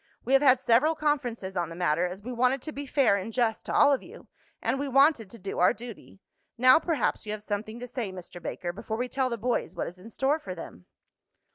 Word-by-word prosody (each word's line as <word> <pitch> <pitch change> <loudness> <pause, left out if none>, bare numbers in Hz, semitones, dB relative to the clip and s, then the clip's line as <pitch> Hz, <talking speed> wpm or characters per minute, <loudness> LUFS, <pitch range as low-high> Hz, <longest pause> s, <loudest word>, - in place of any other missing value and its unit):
We 265 - 0
have 270 - +6
had 265 -3 +5
several 265 +6 +3
conferences 250 -11 -2
on 175 -2 -1
the 165 - -8
matter, 175 0 +1
as 185 +3 -8
we 250 +2 -5
wanted 250 +2 +1
to 310 - -5
be 285 -1 -6
fair 260 -8 +3
and 200 +3 -5
just 225 -2 0
to - - -3
all 290 -1 +5
of 270 - 0
you, - - -13 0.3
and 270 - -1
we 285 - -2
wanted 275 -5 +4
to 230 - -11
do 195 -1 -5
our 180 - +5
duty. 230 -4 -11 0.4
Now 255 +5 +7
perhaps 315 -10 -1
you - - -3
have 210 -1 -7
something 215 +2 -4
to 245 - -6
say, 240 -5 -4
Mr. 180 -1 -10
Baker, 175 +1 -4
before 220 +3 -5
we 250 +2 -1
tell 260 0 -1
the 235 - -3
boys 240 +2 -2
what - - -2
is 180 +2 -9
in 210 +5 -12
store 270 +7 0
for 185 -10 -7
them." 90 - -10
235 Hz, 245 wpm, -28 LUFS, 195-270 Hz, 0.4 s, Now